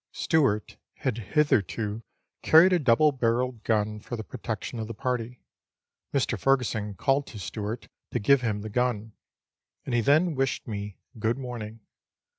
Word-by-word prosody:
Stewart 135 -10 +1 0.2
had 120 -3 -2
hitherto 110 - 0 0.4
carried 170 +4 +7
a 180 - +4
double 145 +2 +4
barrelled 125 -2 0
gun 105 -1 0
for 120 - -6
the 110 - -5
protection 115 0 -5
of 110 - -4
the 115 - -6
party. 125 0 -3 0.7
Mr. 125 -5 0
Fergusson 110 -6 +1
called 135 +6 +1
to 110 - -9
Stewart 105 +4 -5 0.2
to - - -2
give 130 +4 +4
him 105 -4 -1
the 110 - -6
gun, 110 -2 -1 0.7
and 130 - -3
he 120 - +3
then 155 +8 +3
wished 135 -2 -1
me 105 -2 -5
" - - -17
good 110 +3 0
morning." 115 -4 -6
115 Hz, 155 wpm, -27 LUFS, 105-130 Hz, 0.7 s, carried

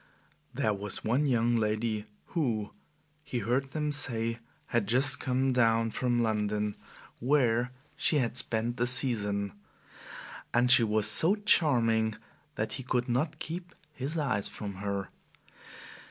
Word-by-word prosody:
There 110 - 0
was 100 0 -5
one 130 +7 +1
young 120 -2 +2
lady 110 -1 -1 0.2
who, 115 - -1 0.5
he 135 -3 -4
heard 125 +5 -1
them 150 +1 -2
say, 115 -5 -1 0.3
had 115 -4 0
just 130 +4 +3
come 130 +1 0
down 115 -2 +2
from 120 0 0
London, 105 -1 -1 0.4
where 125 -3 +2 0.2
she 150 - +1
had 125 -5 0
spent 115 0 -1
the 120 - +1
"season"; 105 -6 +1 1.0
and 125 +1 +4
she 125 - +8
was 110 -1 +1
so 165 - +5
charming 115 - +3 0.4
that 110 +1 -3
he - - -4
could 125 -1 -1
not 150 +6 -1
keep 175 +3 -7 0.2
his 145 +4 -4
eyes 125 -10 0
from 100 -2 -7
her. 100 0 -3
120 Hz, 135 wpm, -29 LUFS, 110-135 Hz, 1.0 s, she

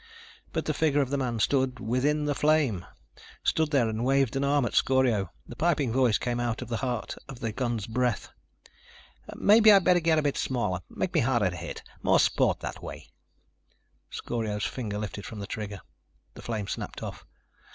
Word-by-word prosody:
But - - -2
the - - 0
figure 145 -2 +2
of 135 -1 -2
the 140 - +1
man 125 -3 -1
stood 130 +2 +1
within 130 +6 0
the 145 - +1
flame! 145 - +1 0.6
Stood 160 -1 +1
there 135 -6 +3
and 110 +1 -2
waved 135 -1 +2
an 135 - 0
arm 140 -1 +2
at - - -3
Scorio. 125 -8 +2 0.2
The 120 - -10
piping 150 -6 +1
voice 125 -4 +3
came 120 -1 -2
out 120 0 -2
of 120 - -11
the 115 - -1
heart 125 -3 -3 0.2
of 135 -3 -8
the 115 - -2
gun's 120 -3 -2
breath. 120 -1 -1 1.1
"Maybe 215 +1 +6
I'd 195 -2 +6
better 180 0 +5
get 165 -1 +2
a 155 - +2
bit 145 -1 0
smaller. 115 -9 -1
Make 185 - -3
me - - +3
harder 120 -7 +2
to - - -7
hit. - - -7 0.2
More - - +4
sport - - +2
that - - -6
way." - - -9 1.0
Scorio's 110 -3 -3
finger 110 -5 -4
lifted 105 -1 -5
from 110 - -8
the 100 - -5
trigger. 105 -3 -6 0.5
The - - -11
flame 110 -4 -3
snapped - - -5
off. - - -7
125 Hz, 190 wpm, -28 LUFS, 110-140 Hz, 1.1 s, Maybe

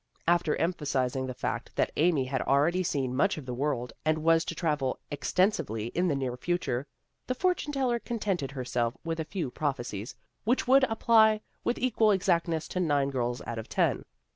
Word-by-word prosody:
After 170 -2 +3
emphasizing 135 -6 -1
the 130 - -5
fact 125 - -4
that - - +1
Amy 155 -4 +3
had 130 0 -2
already 150 +7 +2
seen 135 -7 -1
much 195 +8 +2
of 150 - -7
the 125 - -4
world 125 -2 -2
and 155 0 +1
was 165 0 +4
to - - -4
travel 150 -6 0
extensively 145 - 0
in 180 +6 0
the 150 - +1
near 130 -3 -2
future, 145 -4 -1 0.4
the 255 - -1
for 365 +7 +3
tune 300 - -6
teller 255 -4 0
contented 200 - -2
herself 125 -3 -2
with 165 0 -3
a - - 0
few 160 -6 -3
prophe 140 -4 -2
cies 105 +3 -6 0.3
which 245 +3 +1
would 265 +1 +6
apply 220 -2 +4 0.2
with 240 - 0
equal 230 -3 +2
exactness 170 -5 +1
to 185 - -2
nine 145 -5 +1
girls 120 -2 -2
out 115 -1 -4
of 110 - -8
ten. - - +1
155 Hz, 190 wpm, -29 LUFS, 130-185 Hz, 0.4 s, would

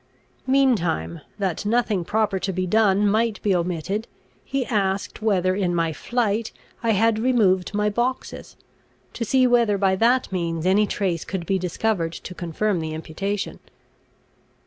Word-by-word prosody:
Meantime, 200 - +1 0.2
that 190 -4 -2
nothing 215 -3 +1
proper 210 +1 0
to 195 - -2
be 185 0 -2
done 205 +1 +3
might 220 +1 +1
be 205 - +2
omitted, 180 +5 -2 0.4
he 275 -2 -2
asked 200 -5 -1
whether 185 -4 +2
in 185 -3 0
my 165 -1 0
flight 225 +2 -1 0.3
I 230 - -1
had 220 +2 +2
removed 210 -6 +2
my 210 0 +1
boxes, 245 +4 -3 0.6
to 235 - -3
see 255 +3 +3
whether 235 -4 +3
by 190 -1 +2
that 240 +5 +2
means 170 -3 -2
any 200 +3 +3
trace 185 -6 -1
could 185 -3 -4
be 190 +2 0
discovered 180 -1 -1
to 180 - -8
confirm 180 +3 -1
the 160 -1 -4
imputation. 195 +6 -4
200 Hz, 145 wpm, -23 LUFS, 180-225 Hz, 0.6 s, done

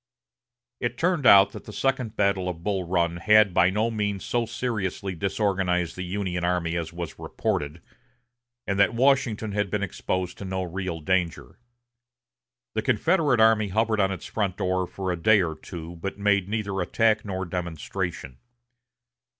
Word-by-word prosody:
It 120 - -2
turned 170 -6 +1
out 100 0 +8
that - - -10
the - - -8
second 130 -2 -1
battle 100 -3 +1
of 85 -2 -7
Bull 95 -2 -1
Run 85 -1 +1
had 105 +1 +5
by 90 +1 +5
no 110 +4 0
means 105 -3 -2
so 120 -1 0
seriously 100 -6 -3
disorganized 95 -2 0
the 90 - -6
Union 90 -1 -3
army 85 -1 0
as 85 -2 -3
was 85 -3 -7
reported, 75 +3 -3 0.8
and 100 0 -1
that 100 +3 +4
Washington 120 -4 +2
had 105 -1 -1
been 105 +1 -1
exposed 95 -1 -3
to - - -6
no 95 0 -2
real 90 -2 -4
danger. 85 0 -1 1.1
The 110 - 0
Confederate 145 - +2
army 110 -1 +5
hovered 110 +2 +1
on 95 -1 +2
its 95 - -6
front 100 -4 -2
for 95 0 -1
a - - 0
day 110 +3 +5
or 85 -4 0
two, 85 +1 -9
but 100 +4 -5
made 100 -2 +1
neither 100 -3 -2
attack 110 +4 +2
nor 95 -2 -4
demonstration. 85 -5 -5
95 Hz, 160 wpm, -25 LUFS, 90-110 Hz, 1.1 s, out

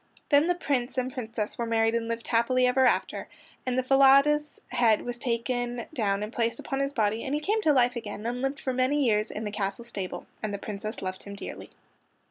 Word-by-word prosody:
Then 290 +2 +5
the 355 - +2
Prince 265 -7 -1
and 255 0 -1
Princess 225 -4 -4
were 235 - 0
married 225 0 +2
and 230 -1 -1
lived 230 0 -4
happily 250 +2 +3
ever 255 +1 +4
after, - - 0 0.4
and 255 0 +1
Falada's 275 +3 +5
head 235 -4 +3
was 245 0 -4
taken 240 0 -2
down 205 -6 0
and 215 +3 -6
placed 230 -1 0
upon 270 - -3
his 275 0 0
body 220 -3 0
and 270 - -1
he - - 0
came 420 +8 0
to 315 - +4
life 250 -3 +3
again 210 -2 -6
and 245 +1 -2
lived 270 +1 -1
for 260 - -2
many 260 +3 +2
years 215 -2 +2
in 215 - -5
the 210 - -3
castle 200 +2 -3
stable, 195 -6 -5 0.2
and 215 - -2
the 200 - -3
Princess 210 +1 -6
loved 185 0 -4
him 200 0 -8
dearly. - - -8
240 Hz, 215 wpm, -27 LUFS, 220-265 Hz, 0.4 s, Then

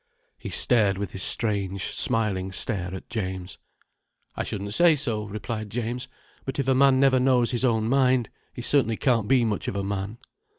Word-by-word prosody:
He - - -7
stared 105 -6 +3
with 100 0 -5
his 95 - -5
strange, 100 -3 +2
smiling 95 -4 +2
stare 95 -2 -1
at 95 - -10
James. 95 -6 -5 0.8
"I - - -2
shouldn't 100 0 -5
say 170 +4 +4
so," 115 -7 -3
replied 110 +1 -6
James. 120 +3 -4 0.4
"But 135 - -5
if 140 -2 -2
a 135 - +3
man 135 0 +4
never 135 -1 +4
knows 125 -2 +2
his 120 0 -2
own 110 -3 +1
mind, 130 -2 +2 0.2
he 120 - -8
certainly 120 -5 +2
can't 115 -6 +1
be 125 -1 +3
much 105 -3 -3
of - - -3
a 100 - -2
man." 100 +2 -4
115 Hz, 180 wpm, -25 LUFS, 100-130 Hz, 0.8 s, say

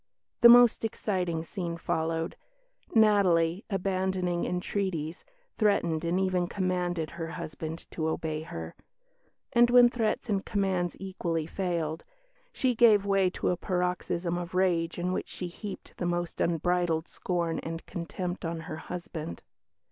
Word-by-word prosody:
"The 235 - +10
most 240 -1 +7
exciting 180 -7 -1
scene 170 -1 -4
followed. 165 -1 -1 0.6
Natalie, 195 -4 +4
abandoning 185 -2 0
entreaties, 180 -3 -2 0.4
threatened 170 -7 +2
and 170 +2 +1
even 185 -2 +1
commanded 180 -4 -1
her 170 -1 -5
husband 160 0 -6
to 160 -1 -2
obey 155 -1 -2
her"; 80 - -7 0.8
and 240 0 +6
when 245 0 +7
threats 230 0 -1
and 200 -3 0
commands 190 -3 0
equally 175 -4 -2
failed, 170 -3 -2 0.5
she 255 -2 +1
gave 220 -4 +5
way 195 -2 +3
to - - -2
a 180 - +1
paroxysm 180 -1 -1
of 175 +1 -6
rage 175 -3 +1
in 180 +1 -1
which - - -2
she 180 - -5
heaped 200 +3 -8
the 175 - -1
most 175 -1 -2
unbridled 170 0 +1
scorn 170 -2 -2
and 165 0 -6
contempt 175 +2 -5
on 165 -1 -3
her 155 -1 -6
husband. 160 - -6
175 Hz, 135 wpm, -29 LUFS, 165-195 Hz, 0.8 s, The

